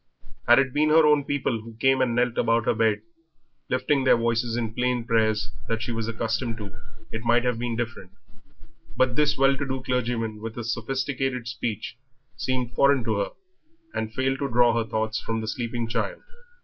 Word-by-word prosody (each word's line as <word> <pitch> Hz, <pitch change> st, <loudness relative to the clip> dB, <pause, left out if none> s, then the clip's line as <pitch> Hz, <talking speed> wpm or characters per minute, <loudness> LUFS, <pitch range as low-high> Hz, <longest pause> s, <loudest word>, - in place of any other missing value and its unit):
Had 120 Hz, +1 st, +8 dB
it 130 Hz, -2 st, +2 dB
been 155 Hz, +1 st, +3 dB
her 160 Hz, +1 st, +6 dB
own 150 Hz, -2 st, +4 dB
people 130 Hz, -5 st, -1 dB
who 115 Hz, 0 st, -11 dB
came 130 Hz, +3 st, +3 dB
and 120 Hz, -2 st, +1 dB
knelt 120 Hz, 0 st, +1 dB
about 115 Hz, -1 st, +2 dB
her -, -, +3 dB
bed, 110 Hz, -2 st, +1 dB, 0.7 s
lifting 135 Hz, +2 st, +1 dB
their 130 Hz, -, +5 dB
voices 115 Hz, 0 st, 0 dB
in 115 Hz, -2 st, -1 dB
the -, -, -14 dB
plain 125 Hz, 0 st, 0 dB
prayers 110 Hz, -4 st, +1 dB, 0.3 s
she 115 Hz, +2 st, -4 dB
was 115 Hz, -1 st, -2 dB
accustomed 115 Hz, +1 st, -2 dB
to, 105 Hz, -2 st, -7 dB, 0.4 s
it 115 Hz, 0 st, -4 dB
might 120 Hz, +1 st, +3 dB
have 125 Hz, -2 st, 0 dB
been 120 Hz, -1 st, -2 dB
different; 115 Hz, -5 st, -4 dB, 0.9 s
but 130 Hz, -2 st, +2 dB
this 150 Hz, -1 st, +2 dB
well 135 Hz, +1 st, +4 dB
to 140 Hz, -, -3 dB
do 130 Hz, -1 st, -3 dB
clergyman, 115 Hz, -4 st, -1 dB
with 115 Hz, 0 st, -6 dB
his 120 Hz, 0 st, -2 dB
sophisticated 130 Hz, +1 st, -2 dB
speech, 115 Hz, 0 st, -4 dB, 0.4 s
seemed 125 Hz, -2 st, -2 dB
foreign 140 Hz, 0 st, +4 dB
to 110 Hz, -2 st, 0 dB
her, 100 Hz, -, 0 dB, 0.6 s
and 110 Hz, 0 st, -3 dB
failed 130 Hz, +2 st, -1 dB
to 140 Hz, -, -1 dB
draw 120 Hz, -1 st, +4 dB
her 115 Hz, -1 st, -1 dB
thoughts 110 Hz, +1 st, -1 dB
from 115 Hz, 0 st, -2 dB
the 110 Hz, -, -4 dB
sleeping 120 Hz, +1 st, -3 dB
child. -, -, -2 dB
120 Hz, 190 wpm, -25 LUFS, 115-130 Hz, 0.9 s, Had